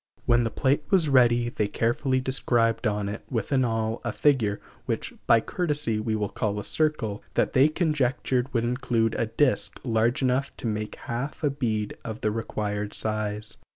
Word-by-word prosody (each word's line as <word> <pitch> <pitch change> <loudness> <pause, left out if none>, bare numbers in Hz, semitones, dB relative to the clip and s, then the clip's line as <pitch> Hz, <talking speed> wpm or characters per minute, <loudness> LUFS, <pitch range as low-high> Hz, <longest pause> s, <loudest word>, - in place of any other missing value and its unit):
When 120 0 +4
the - - 0
plate 140 +5 +1
was 175 -6 +3
ready 120 -3 +4
they 105 -3 -1
carefully 130 +5 0
described 120 -3 +1
on 105 -1 -1
it, 105 - -5
with 115 -2 -2
an 135 -2 +3
awl, 115 -1 -1
a 120 - -1
figure 115 -7 +2 0.3
(which, - - -2
by 115 - +6
courtesy, 150 -9 0
we 110 0 -1
will 105 -1 -1
call 105 0 -2
a 105 - -6
circle) 150 -10 -1
that - - +1
they 135 +3 +5
conjectured 135 -5 0
would 115 -3 0
include 120 -2 0
a 115 - -1
disk 130 +4 +1
large 120 +2 +1
enough 130 +2 0
to - - -7
make 105 -1 -2
half 125 +7 -5
a 145 - +2
bead 110 -6 -2
of 110 +2 -6
the 105 - +1
required 105 -2 -3
size. 110 -1 -2
120 Hz, 180 wpm, -26 LUFS, 110-130 Hz, 0.3 s, by